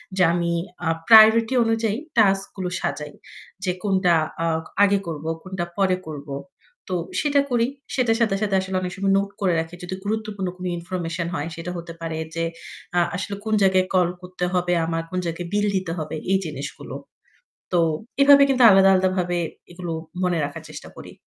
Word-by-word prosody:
যে 185 - +3
আমি 170 -1 0 0.3
অ্যাঁ 165 -2 0
প্রায়োরিটি 225 +2 +8
অনুযায়ী 225 -1 0 0.2
টাস্কগুলো 195 -3 +2
সাজাই। 150 -1 -4 0.5
যে 185 - +1
কোনটা 190 -3 +3 0.2
অ্যাঁ 165 -1 0 0.2
আগে 200 0 +4
করব, 160 -2 -5 0.2
কোনটা 185 -2 -4
পরে 190 -2 +2
করব। 145 -1 -8 0.6
তো - - +1 0.2
সেটা 285 -1 +3
করি। 235 -1 +3 0.3
সেটার 240 -3 +2
সাথে 215 -4 +2
সাথে 205 -2 +1
আসলে 190 0 -4
অনেক 180 -1 -3
সময় 195 0 +1
নোট 200 0 0
করে 185 -3 +2
রাখি 165 +2 -5
যদি 180 +1 -4
গুরুত্বপূর্ণ 210 -3 -2
কোন 185 - -7
ইনফরমেশন 170 -1 -4
হয় 150 -2 -3
সেটা 165 +2 -5
হতে 170 0 -7
পারে 160 -1 -3 0.2
যে 165 - -1 0.5
অ্যাঁ 175 -1 +3
আসলে 200 +1 -4
কোন 220 - -1
জায়গায় 185 -1 +4
কল 180 -2 +3
করতে 180 0 -4
হবে 180 -1 +1
আমার, 165 0 -2
কোন 185 +1 -2
জায়গায় 170 +1 -4
বিল 205 0 +2
দিতে 185 -3 -3
হবে 155 0 -4 0.2
এই 195 - +5
জিনিসগুলো। 145 -3 -7 0.8
তো 175 - +3 0.4
এভাবে 280 0 +8
কিন্তু 260 -2 +2
আলাদা 195 0 +6
আলাদাভাবে 185 -1 +1 0.3
এগুলো 175 -1 -5 0.3
মনে 180 -2 +1
রাখার 160 +3 -6
চেষ্টা 150 -1 -9
করি। - - -10
185 Hz, 170 wpm, -23 LUFS, 170-200 Hz, 0.8 s, প্রায়োরিটি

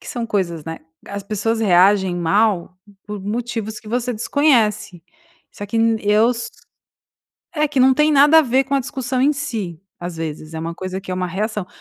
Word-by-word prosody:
que - - -15
são 240 -2 -3
coisas, 170 -7 -2
né. 165 0 -6 0.3
As 200 0 -6
pessoas 215 +3 -2
reagem 190 -1 +4
mal 185 +1 +1 0.3
por 210 -1 -6
motivos 220 +1 -4
que 215 - -13
você 245 +2 -1
desconhece, 220 - +1 0.5
só 205 - -8
que 205 - -4
n 225 0 +2
eu 210 +3 +4
s 230 -1 -4 1.1
É, 300 -1 +1
que 280 -2 -2
não 260 +1 +6
tem 300 +3 +3
nada 295 +2 +6
a - - +6
ver 265 0 +2
com 275 +1 -2
a 275 - +2
discussão 255 0 -3
em 275 +3 +4
si, 215 - -4 0.2
às 175 -1 -6
vezes, 155 0 -6
é - - -4
uma 165 +1 -4
coisa 185 +2 -5
que 185 - -9
é - - -1
uma 180 0 -2
reação. 210 +2 -3
215 Hz, 200 wpm, -20 LUFS, 185-245 Hz, 1.1 s, não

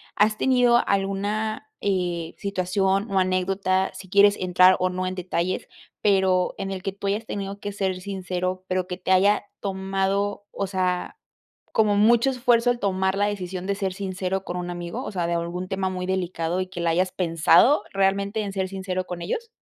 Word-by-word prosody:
¿Has 215 +1 +3
tenido 245 -2 +4
alguna, 205 - -1
eh, 175 -4 -1
situación, 195 +1 0
o, 190 - +3
anécdota, 185 +1 +1
si 190 - -10
quieres 205 +1 +5
entrar, 185 0 +5
o, 185 0 +1
no 185 0 -3
en 185 0 -3
detalles, 180 0 -2 0.3
pero 190 -3 +2
en 195 0 -4
el 190 -1 -4
que 195 - -2
tú 200 0 -5
hayas 210 +3 -1
tenido 200 -1 -5
que 205 -1 -5
ser 190 -2 -1
sincero, 185 -1 -3
pero 185 0 0
que 180 - -4
te 185 0 -3
haya 200 +3 +4 0.2
tomado, 195 +1 -1
o 200 - -3
sea, 185 - -1 0.5
como 210 -2 +3
mucho 235 +5 +4
esfuerzo 245 -1 +3
el 240 - -3
tomar 190 -1 0
la 205 +1 +2
decisión 185 -2 -4
de 200 - 0
ser 195 -2 -2
sincero 190 -1 -3
con 180 -1 -5
un 175 0 -4
amigo, 175 -1 -5
o - - -5
sea, 175 -2 -1
de 170 - -1
algún 170 +2 -3
tema 190 -1 -1
muy 180 -1 -4
delicado, 180 -2 -1
y 185 - -2
que 180 -2 -6
la 170 - +1
hayas 180 +2 +1
pensado 180 - +4
realmente 200 +2 +1
en 200 -1 -4
ser 190 -1 -2
sincero 185 -1 -3
con 175 -1 -6
ellos? 450 - -3
190 Hz, 190 wpm, -24 LUFS, 185-200 Hz, 0.5 s, quieres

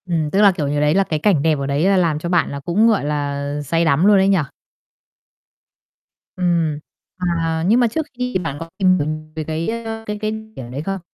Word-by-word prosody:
Ừm, 165 -4 -1
tức 200 - +2
là, 200 -2 +7
kiểu 165 -6 -3
như, 145 +1 0
đấy 150 +1 +3
là 195 - +4
cái 155 -5 -2
cảnh 165 -3 +2
đẹp 155 -1 +1
ở 140 - -2
đấy 140 +4 0
là 195 -1 +4
làm 165 -4 +1
cho 170 - -4
bạn 175 -2 +1
là 140 - -5
cũng, 175 +10 +2
gọi 215 -9 +2
là, 145 -1 -2
say 165 +4 0
đắm 160 +3 +3
luôn 205 -1 +6
ấy 190 0 +3
nhỉ? 195 -1 +4 2.0
Ừm, 170 -4 0 0.4
à, 165 -3 -1
nhưng 225 +5 +4
mà 245 - +4
trước 310 +8 -2
khi 250 -2 -3
bạn 140 -3 -4
có 165 - -7
tìm 185 -2 +4
hiểu 145 - -1 0.3
về 160 - -3
cái, 160 +3 -3
ơ, 225 0 -6
cái 210 0 -3
cái 215 0 -1 0.2
điểm 120 -2 -8
đấy 135 +3 -4
không? 195 +3 -4
165 Hz, 230 wpm, -20 LUFS, 150-195 Hz, 2.0 s, là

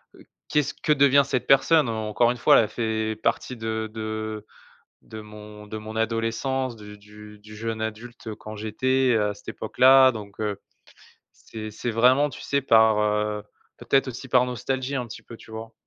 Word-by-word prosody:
heu, - - -17 0.2
qu'est 150 - +2
ce 140 - -5
que 150 - +1
devient 140 0 +5
cette 130 -2 -2
personne?» 140 +1 +4
Encore 110 +1 +1
une 125 - -5
fois - - +5
elle - - +5
a - - -6
fait 110 -1 -2
partie 125 - -1
de 110 -1 -3
de 110 -1 -5 0.6
de 110 - -10
mon 105 0 -12
de 110 - -7
mon 110 +1 -8
adolescence 115 +3 -1
du 105 -1 -12
du 105 +1 -14
du 105 0 -13
jeune 110 0 -4
adulte 110 +1 -6
quand 110 - -9
j'étais 130 +4 +1
à 105 -1 0
cette - - -19
époque - - -7
là 130 0 +8
donc, 105 -3 -9
heu, 105 -2 -3 0.7
c'est 110 -1 -9
c'est 120 +3 -4
vraiment 130 +6 +3
tu 115 - -11
sais 140 - -1
par, 110 -4 +5
heu, 105 0 0 0.3
peut-être 135 -1 +1
aussi 130 +1 -8
par 125 0 +4
nostalgie 130 +2 -3
un 125 -2 -3
petit 110 - -10
peu, 115 - -12
tu 110 - -16
vois? 110 0 -8
110 Hz, 190 wpm, -24 LUFS, 105-125 Hz, 0.7 s, là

